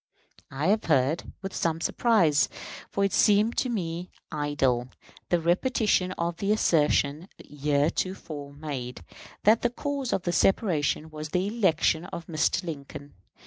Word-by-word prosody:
I 140 +3 -3
have 215 +2 +2
heard, 145 +1 +1
with 195 - -5
some 165 -1 -1
surprise, 170 -6 +3 0.4
for 200 - 0
it 195 - -1
seemed 210 +3 +4
to 255 - +1
me 180 -5 -3 0.2
idle, 135 -5 0 0.4
the 175 - +3
repetition 185 +2 +1
of 170 -1 -3
the 200 +2 0
assertion 155 -3 +2
heretofore 145 +1 -2
made, 135 - -6 0.4
that 220 +2 +5
the 240 - +2
cause 275 +1 -3
of 180 - 0
the 175 - -1
separation 160 -4 +1
was 155 0 -6
the 180 +3 0
election 190 -6 +1
of 170 -2 -7
Mr. 165 +2 0
Lincoln. 145 -3 -8
165 Hz, 140 wpm, -27 LUFS, 145-195 Hz, 0.4 s, that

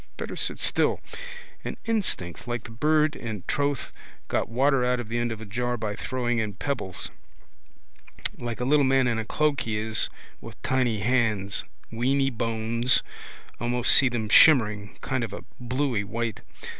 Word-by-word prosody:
Better - - -5
sit - - -1
still. - - +2 0.6
All - - -4
instinct 185 - -1
like 120 -1 -3
the 115 - -10
bird 150 +6 +2
in 110 -5 -6
drouth 140 -2 -1 0.4
got - - 0
water 135 +2 +2
out 125 0 +1
of 120 -3 -6
the 120 +1 -1
end 120 0 -1
of 115 - -5
a 110 - -8
jar 120 +4 -2
by 105 -2 -3
throwing 120 0 -1
in 105 -2 -3
pebbles. 110 -11 -3 1.2
Like 120 -1 -5
a 125 - -1
little 145 +2 +4
man 135 -1 +3
in 115 -2 0
a 110 - -3
cloak 150 +3 +1
he 110 -2 -2
is 110 0 0 0.3
with - - -11
tiny 125 -5 +1
hands. 110 -4 0 0.3
Weeny 135 +4 +1
bones. 115 +1 +2 0.6
Almost 120 +1 +4
see 130 - +7
them 115 -3 -2
shimmering, 105 -6 +5
kind 130 -2 -1
of 110 -3 -5
a - - -7 0.2
bluey 125 -3 -1
white. 115 +1 -3
120 Hz, 165 wpm, -26 LUFS, 110-130 Hz, 1.2 s, see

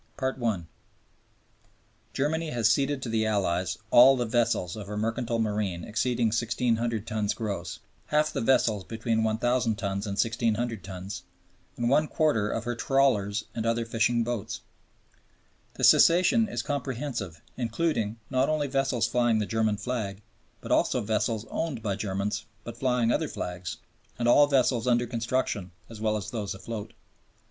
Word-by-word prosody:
I 130 -1 0
(1) 110 -10 -2 1.5
Germany 160 +4 -1
has 115 -5 +2
ceded 135 +2 0
to 120 - -4
the 110 -1 +1
Allies 95 -5 0
all 130 +2 +8
the 120 - 0
vessels 115 -7 0
of 105 -3 -7
her 105 0 -5
mercantile 115 +2 -1
marine 105 -6 -1
exceeding 115 +2 0
1600 115 -1 0
tons 110 -2 -1
gross, 100 -7 -4 0.3
half 150 0 +1
the - - -1
vessels 115 -4 +2
between 115 +1 -1
1000 115 +1 +1
tons 100 0 -3
and 100 - -2
1600 115 -1 0
tons, 95 0 -7 0.6
and 120 - 0
one 150 +5 +3
quarter 145 -12 +1
of 115 - -2
her 120 +1 -2
trawlers 110 -6 +2
and 115 -1 -2
other 115 0 +1
fishing 115 +1 +1
boats. 120 -3 -4 1.1
The - - -6
cession 200 +6 +6
is - - -3
comprehensive, 130 - -3 0.2
including 115 -2 -1
not 130 +2 +2
only 155 -1 +1
vessels 135 -3 +1
flying 120 -2 +2
the 105 - 0
German 110 -1 0
flag, 105 -2 -4 0.4
but - - -7
also - - +3
all - - -6
vessels 110 +1 0
owned 145 -9 -3
by 100 -3 -1
Germans 100 +1 -3 0.2
but 120 - -7
flying 125 -2 +1
other - - +1
flags, 90 0 -5 0.4
and 120 - 0
all 145 +4 +6
vessels 130 -4 +2
under 120 0 +3
construction 115 -4 -2 0.2
as 110 -2 -9
well 110 -1 +1
as 100 - -6
those 105 -5 -3
afloat. 105 +1 -7
115 Hz, 155 wpm, -27 LUFS, 105-125 Hz, 1.5 s, all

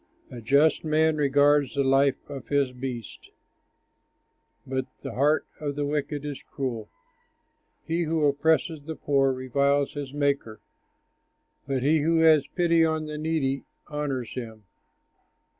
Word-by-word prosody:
A 120 - -8
just 140 +6 +3
man 155 0 +2
regards 145 -1 +3
the 140 - +2
life 135 0 +2
of 140 -3 -8
his 140 -2 +1
beast, 125 -3 -7 1.4
But 130 0 -3 0.2
the - - -5
heart 145 +4 +2
of 145 -2 -3
the 145 0 -1
wicked 145 0 -3
is 145 -2 -5
cruel. 120 -7 -5 1.0
He 170 +1 -1
who 160 -1 +1
oppresses 160 +2 +1
the 160 +2 -6
poor 135 -2 +2
reviles 140 +2 0
his 145 -3 -6
Maker, 140 -6 -1 1.1
But 135 -2 -1
he 155 +3 +3
who 165 +3 +2
has 155 -4 +5
pity 170 -2 +2
on 160 -1 0
the 150 0 -6
needy 150 -4 -1 0.3
honors 145 -5 -3
him. 110 -4 -7
145 Hz, 135 wpm, -26 LUFS, 135-155 Hz, 1.4 s, has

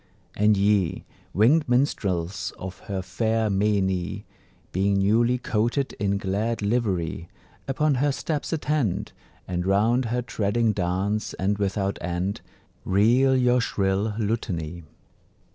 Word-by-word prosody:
And 105 0 +3
ye, 100 -4 +1 0.3
winged 140 - +3
minstrels 95 -8 0
of 95 0 -7
her 95 -2 -2
fair 110 +3 0
meinie, 100 -1 0 0.5
Being 100 +2 +1
newly 115 +5 +3
coated 120 +4 -1
in 100 0 +1
glad 105 +3 -2
livery, 95 -7 -1 0.4
Upon 150 +2 +1
her 145 0 +3
steps 150 +1 -3
attend, 150 - -1 0.4
And 90 -1 -2
round 110 +7 +2
her 120 +2 -1
treading 110 0 0
dance 100 +2 -1
and 100 +2 -1
without 100 0 -1
end 90 +3 -2 0.4
Reel 120 +7 +3
your 125 0 +3
shrill 100 0 0
lutany. 90 -7 -2
105 Hz, 115 wpm, -25 LUFS, 95-120 Hz, 0.5 s, And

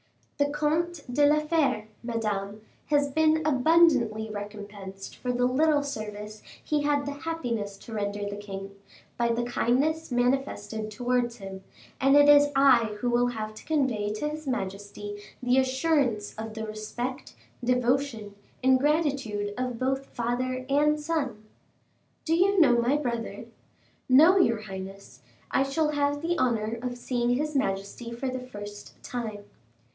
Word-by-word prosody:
"The 285 0 +3
Comte 305 +3 0
de 290 +2 +5
la 300 +1 +4
Fere, 300 -9 +1
Madame, 215 -3 -3 0.3
has 285 -1 +2
been 315 +1 +3
abundantly 265 -7 +4
recompensed 205 -2 -8
for 250 - -3
the 245 0 +1
little 290 +3 +3
service 215 -5 -6 0.2
he 300 -1 0
had 290 -1 +1
the 285 - -3
happiness 245 -10 -3
to 225 - -11
render 205 -1 -2
the 205 0 -5
king, 195 -1 -7 0.5
by 235 - +2
the 235 +1 0
kindness 275 +6 0
manifested 245 -4 -1
towards 245 +1 0
him, 195 -2 -8 0.4
and 270 +1 +4
it 290 0 +7
is 290 0 +7
I 270 -4 +6
who 245 +2 0
will 240 +1 +3
have 215 -3 -4
to 215 - -12
convey 260 -9 0
to 300 +8 -2
his 305 -1 -7
majesty 205 -2 -4 0.2
the 250 +1 +4
assurance 260 -5 +1
of 220 0 -7
the 220 0 -4
respect, 240 +5 -5 0.3
devotion, 250 -3 0 0.3
and 260 0 +5
gratitude 275 -9 0
of 250 -1 -3
both 265 +2 -1
father 255 +2 -2
and 300 +2 +3
son." 290 -8 -2 0.8
"Do 325 - +1
you 385 +3 +3
know 245 -7 +6
my 255 +5 +2
brother?" 235 -5 -3 0.6
"No, 315 +9 +7
your 230 -11 +3
highness; 190 -8 -9 0.3
I - - +3
shall 300 +3 +1
have 290 0 0
the 345 +1 0
honor 230 -3 0
of 245 -1 -4
seeing 245 0 0
his 300 +3 -2
majesty 200 -1 -2
for 240 +3 -3
the 255 0 -3
first 205 -5 -9
time." 220 -4 -5
245 Hz, 150 wpm, -27 LUFS, 215-285 Hz, 0.8 s, it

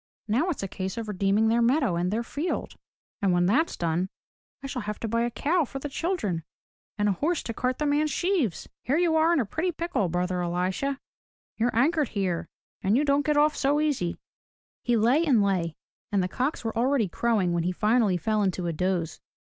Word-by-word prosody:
Now 250 - +1
it's 315 - -3
a - - -2
case 190 +1 -5
of 225 -1 -4
redeeming 200 +2 +2
their 230 +1 +3
meadow 245 - +2
and 175 +1 0
their 220 +4 -1
field. 295 +8 -3 0.5
And 195 -2 +3
when 175 0 +3
that's 275 - +2
done, 170 +2 0 0.5
I - - -5
shall 270 -2 -3
have 210 0 -5
to 230 - -2
buy 230 +2 0
a 240 - +1
cow 325 +8 +1
for 270 - -6
the 285 +2 -5
children, 270 - -2 0.5
and 205 0 +1
a - - +3
horse 310 - -1
to 230 - -4
cart 255 +2 -1
the 300 - -1
man's 295 +1 +2
sheaves. 345 - 0
Here 275 +5 0
you 340 -2 +2
are 320 +1 +4
in 340 - +3
a 245 - +1
pretty 325 - -1
pickle, 335 - -1
brother 180 +1 -1
Elisha! 185 +11 -1 0.6
You're 240 +1 0
anchored 295 +3 +2
here 185 -5 -2 0.3
and 200 +5 +2
you 295 - +2
don't 285 0 +3
get 300 -1 +2
off 300 +1 +4
so 285 +2 +2
easy!" 280 - 0 0.6
He 240 -1 +1
lay 245 +9 +3
and 255 -10 +4
lay 175 -5 0 0.4
and 200 -3 +2
the - - 0
cocks 255 - -2
were 225 - -2
already 245 -1 +2
crowing 200 -2 +1
when 170 - +1
he 175 +2 0
finally 210 0 +2
fell 215 +4 0
into 185 -2 0
a 170 - -1
doze. 175 0 -1
230 Hz, 210 wpm, -27 LUFS, 185-290 Hz, 0.6 s, are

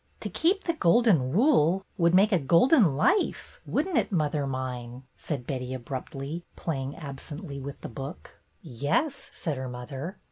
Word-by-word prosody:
"To - - -3
keep 380 +5 +2
the 335 - 0
Golden 180 - +3
Rule 195 - +3
would 170 0 +3
make 200 +4 +5
a 185 - +4
Golden 170 - +5
Life, 395 - +1
would 305 - 0
n't 340 -10 +2
it, 215 - -2
mother 150 -5 0
mine? 125 -1 -5
" - - -43
said 140 -6 -5
Betty, 130 -1 -3
abruptly, 135 +5 -5
playing 135 -4 -3
absently 145 +1 -7
with 140 +1 -7
the - - -5
book 135 +7 -8 0.2
"Yes," 165 - -1
said 155 -5 -3
her 130 0 -4
mother. 135 +9 -6
150 Hz, 165 wpm, -27 LUFS, 135-195 Hz, 0.2 s, make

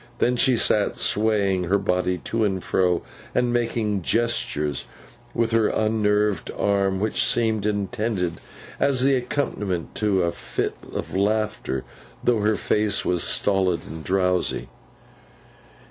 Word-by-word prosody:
Then 125 - +2
she 125 0 +3
sat 105 -2 +1
swaying 100 -4 +1
her 95 +4 +2
body 90 -2 0
to 115 0 -1
and 95 -3 0
fro, 90 -2 +1 0.3
and 125 -1 +2
making 115 -4 0
gestures 85 - -1 0.5
with 115 -1 +1
her 115 -1 +3
unnerved 105 -3 +1
arm, 100 -1 +1
which 110 +2 +1
seemed 110 -3 +1
intended 105 -3 -1 0.4
as 135 -2 +2
the 135 +1 +4
accompaniment 115 - -2
to 100 -4 +2
a 85 - +1
fit - - -3 0.2
of - - -5
laughter, 100 -9 0 0.4
though 120 -3 +3
her 105 +1 +2
face 105 -1 +1
was 90 -2 +1
stolid 95 -4 +2
and 80 +1 -8
drowsy. 90 -9 0
105 Hz, 130 wpm, -24 LUFS, 95-110 Hz, 0.5 s, the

